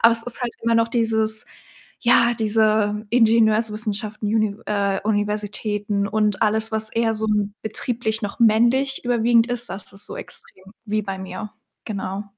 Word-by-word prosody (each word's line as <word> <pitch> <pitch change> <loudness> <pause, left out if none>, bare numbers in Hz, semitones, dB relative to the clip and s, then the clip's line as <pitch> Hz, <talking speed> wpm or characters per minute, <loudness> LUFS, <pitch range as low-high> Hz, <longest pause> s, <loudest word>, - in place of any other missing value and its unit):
Aber 230 - +7
es 230 - +5
ist 245 0 +2
halt 240 - -2
immer 230 0 +2
noch 230 0 +3
dieses 220 -2 +2 0.5
ja, 240 0 +4
diese 215 -1 +1
Ingenieurswissenschaften 220 -2 +1
Univ 215 -1 0
äh, 200 -2 0
Universitäten 205 -1 -1
und 210 -1 0
alles, 220 +1 +1
was 220 0 0
eher 225 -1 +1
so 220 0 -2
'n 210 -1 0
betrieblich 220 0 -2
noch 205 +2 -5
männlich 240 +4 +3
überwiegend 235 -1 +3
ist, 245 -1 -3
das 195 +1 -6
ist 195 - -1
so - - -7
extrem, 190 - -7 0.2
wie 215 0 -1
bei 195 -1 -5
mir, 190 +2 -7 0.4
genau. 200 -1 -4
220 Hz, 155 wpm, -22 LUFS, 210-230 Hz, 0.5 s, Aber